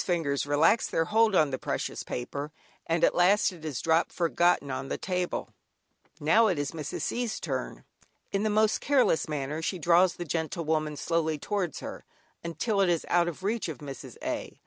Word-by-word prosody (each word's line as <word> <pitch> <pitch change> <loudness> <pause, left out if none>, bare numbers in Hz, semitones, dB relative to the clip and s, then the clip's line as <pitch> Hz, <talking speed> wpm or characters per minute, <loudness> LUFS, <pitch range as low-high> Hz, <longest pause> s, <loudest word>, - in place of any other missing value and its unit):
fingers 150 -6 0
relax 155 +10 +3
their 165 - 0
hold 220 0 +3
on 155 -5 +4
the 130 - -3
precious - - -3
paper, 140 +4 -5 0.4
and 165 0 +1
at - - +5
last 195 +3 +4
it 165 -3 -13
is 150 -6 -3
dropped, 165 +1 +2
forgotten, 170 -4 +1
upon 130 +1 -4
the - - -3
table. 180 -1 -2 0.7
Now 170 +10 +4
it 185 - +1
is 145 -1 -2
Mrs. 155 -3 -5
C's. 240 -2 -2
turn. - - -4 0.5
In 195 - 0
the 215 - +1
most 215 +1 +2
careless 255 - +2
manner 150 +1 -3
she 185 +3 -2
draws 175 +2 +4
the 175 - -5
"Gentlewoman" 155 -1 -1
slowly 160 -1 0
towards 180 0 -3
her, - - -7 0.4
until 195 +6 -1
it 190 - +3
is 170 -2 0
out 175 0 +3
of 175 +2 -5
reach 210 -2 -1
of 155 - -5
Mrs. 140 -1 -9
A. - - -4
170 Hz, 185 wpm, -28 LUFS, 150-190 Hz, 0.7 s, at